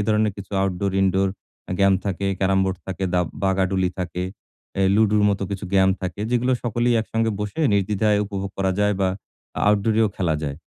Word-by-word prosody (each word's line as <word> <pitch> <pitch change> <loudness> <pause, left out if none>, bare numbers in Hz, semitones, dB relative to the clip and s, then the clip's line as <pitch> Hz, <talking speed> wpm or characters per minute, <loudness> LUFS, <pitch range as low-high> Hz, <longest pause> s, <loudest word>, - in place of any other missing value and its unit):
ধরণের 110 -1 +2
কিছু 100 -2 -9
আউটডোর-ইনডোর 95 0 +1 0.4
আ - - 0
গেম 100 -1 +5
থাকে, 100 0 -2
ক্যারাম 95 0 +2
বোর্ড 95 0 -1
থাকে, 95 0 -3
দা 90 - +4 0.2
বাগাডুলি 95 -1 +1
থাকে, 90 0 -3 0.5
অ্যা 95 - 0
লুডুর 105 0 +3
মতো 100 -1 0
কিছু 100 0 -4
গেম 95 -1 +5
থাকে 90 +1 -4
যেগুলো 125 +1 +2
সকলেই 120 +1 +1
একসঙ্গে 115 0 -1
বসে 105 +10 -3
নির্দ্বিধায় 105 +1 +2
উপভোগ 100 -1 -4
করা 95 -1 +1
যায় 105 0 +2
বা 95 - +3 0.6
আউটডোর 105 +1 +2
এও 110 - +3
খেলা 85 -5 +1
যায়। 70 -2 -3
100 Hz, 175 wpm, -23 LUFS, 95-105 Hz, 0.6 s, গেম